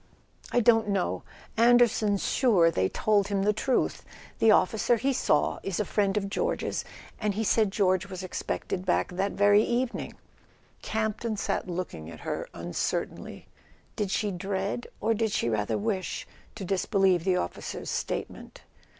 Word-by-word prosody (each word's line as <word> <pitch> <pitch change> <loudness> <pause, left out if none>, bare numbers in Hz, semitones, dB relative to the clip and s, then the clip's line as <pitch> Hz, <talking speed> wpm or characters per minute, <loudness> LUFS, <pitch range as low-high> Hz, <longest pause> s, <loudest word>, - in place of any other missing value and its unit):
"I 245 - +3
don't 225 -1 +4
know. 195 -3 0 0.3
Anderson's 230 -3 +4
sure 195 -11 +4
they 95 - +1
told 205 -2 +2
him 200 -1 0
the 210 +1 +3
truth. 255 +4 0 0.4
The 225 - +5
officer 220 +3 +4
he 270 +5 0
saw 150 -10 +1
is 195 -1 -3
a 210 - +1
friend 200 0 +1
of 200 -1 -1
George's, 475 - -2 0.4
and 210 -3 -1
he 220 - -1
said 220 -1 +3
George 185 -2 +1
was 190 -1 -7
expected 185 0 -3
back - - +1
that 190 +2 -1
very 205 +1 +5
evening." 240 +2 -2 0.7
Camp 220 -1 -2
ton 225 -2 -3
sat 200 - -2
looking 170 - -5
at 80 -2 -11
her - - -4
uncertainly. 85 +1 -4 0.5
Did 205 -2 -1
she 205 +1 0
dread, 195 +5 -3
or 225 - +1
did 220 -1 0
she 120 - 0
rather 105 -2 0
wish, 205 -3 -2 0.3
to 205 -3 -6
disbelieve 190 -1 +2
the 185 0 +2
officer's 85 - -4
statement? - - -5
200 Hz, 155 wpm, -28 LUFS, 185-220 Hz, 0.7 s, The